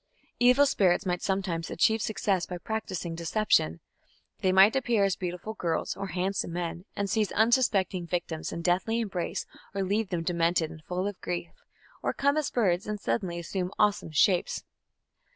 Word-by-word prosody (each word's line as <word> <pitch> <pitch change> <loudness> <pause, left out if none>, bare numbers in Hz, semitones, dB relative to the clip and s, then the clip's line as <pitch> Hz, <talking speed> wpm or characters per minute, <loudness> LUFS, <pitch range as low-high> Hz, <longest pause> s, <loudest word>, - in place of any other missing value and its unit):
Evil 250 +4 +6
spirits 190 -10 +2
might 180 -1 -1
sometimes 190 -4 -1
achieve 220 +5 +2
success 200 -4 0
by 180 - -5
practising 185 -3 -4
deception. 165 - +1 0.6
They 185 - +2
might 190 +5 +6
appear 240 -6 +2
as 195 -2 +2
beautiful 180 +4 -5
girls 170 -6 -2
or 195 0 -4
handsome 185 -1 -2
men 175 +1 -4
and 200 - -1
seize 215 0 0
unsuspecting 215 -6 +2
victims 165 -2 -3
in 170 - -5
deathly 190 +6 +1
embrace 195 -6 -3 0.3
or 195 - 0
leave 205 +2 0
them 175 -3 -2
demented 170 -1 +1
and 155 -1 -12
full 180 +2 -2
of 205 -2 -6
grief, 175 -1 -3 0.5
or - - -1
come 280 +1 +2
as 305 -2 0
birds 190 -7 +1
and 210 -1 -3
suddenly 185 -5 -2
assume 180 +2 -3
awesome 205 -5 +2
shapes. 175 +4 +2
190 Hz, 165 wpm, -28 LUFS, 175-210 Hz, 0.6 s, Evil